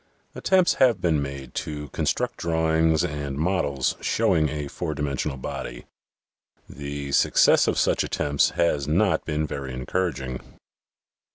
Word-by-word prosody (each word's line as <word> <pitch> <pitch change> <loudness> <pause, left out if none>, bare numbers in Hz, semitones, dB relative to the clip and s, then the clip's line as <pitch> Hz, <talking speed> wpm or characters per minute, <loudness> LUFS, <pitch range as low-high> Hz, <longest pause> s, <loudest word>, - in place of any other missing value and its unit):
Attempts 185 -2 +3
have 120 -6 +5
been 80 -4 +1
made 70 -1 -6
to 75 -1 -5
construct - - -1
drawings 80 -1 +2
and 70 -2 -3
models 75 -5 0
showing 75 -2 +2
a 75 -2 -4
four 75 +2 -4
dimensional 70 -1 -2
body. - - -6 0.8
The 70 0 -6
success - - +4
of - - +1
such - - +2
attempts 70 -1 +1
has 75 -5 +1
not 95 +6 +2
been 75 -1 -1
very 70 -3 -5
encouraging. 65 -2 -2
75 Hz, 125 wpm, -25 LUFS, 70-80 Hz, 0.8 s, have